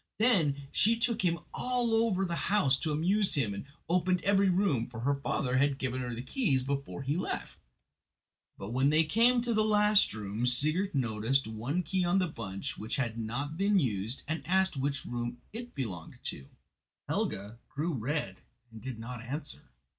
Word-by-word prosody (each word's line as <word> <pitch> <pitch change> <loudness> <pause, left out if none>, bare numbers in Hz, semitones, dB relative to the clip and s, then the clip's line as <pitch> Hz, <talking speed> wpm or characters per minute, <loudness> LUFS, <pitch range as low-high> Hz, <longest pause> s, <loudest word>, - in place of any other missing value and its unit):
Then 165 - +3
she 230 +2 +3
took 235 -1 +1
him 170 -3 +2 0.2
all 245 -2 0
over 225 -4 +2
the 170 -2 -2
house 195 -10 +4
to 160 - -2
amuse 190 +7 +2
him, 120 -8 0
and 100 - -6 0.2
opened 180 +1 +1
every 200 0 +4
room, 175 - +2
for 115 -2 -8
her 140 +4 +2
father 140 -2 -1
had 140 0 +2
given 130 -1 -2
her 120 -1 -3
the 120 - -5
keys 135 - +1
before 140 +1 -3
he 140 +3 0
left; 180 - -4 1.0
but 100 +3 -6
when 130 +3 +3
they 155 +2 +5
came 235 +9 +4
to 240 -1 0
the 215 0 +3
last 210 -1 +4
room 105 +3 -2
Sigurd 155 +9 +2
noticed 120 +1 +1
one 120 +11 -2
key 185 +1 0
on 175 +2 +2
the 185 - +3
bunch 100 - -5
which 110 +5 -3
had 120 -6 -1
not 135 +8 -3
been 200 +2 +3
used 115 - -1
and 160 +1 -2
asked 190 -1 +2
which 140 +1 -2
room 120 0 -3 0.2
it 240 +2 -7
belonged 95 - -5
to." 70 -1 -5 0.6
Helga 105 +4 -2
grew 160 +4 -2
red 125 -5 -2 0.3
and 110 -1 -11
did 130 -3 -5
not 115 +1 -7
answer. 145 +5 -6
145 Hz, 180 wpm, -31 LUFS, 120-190 Hz, 1.0 s, they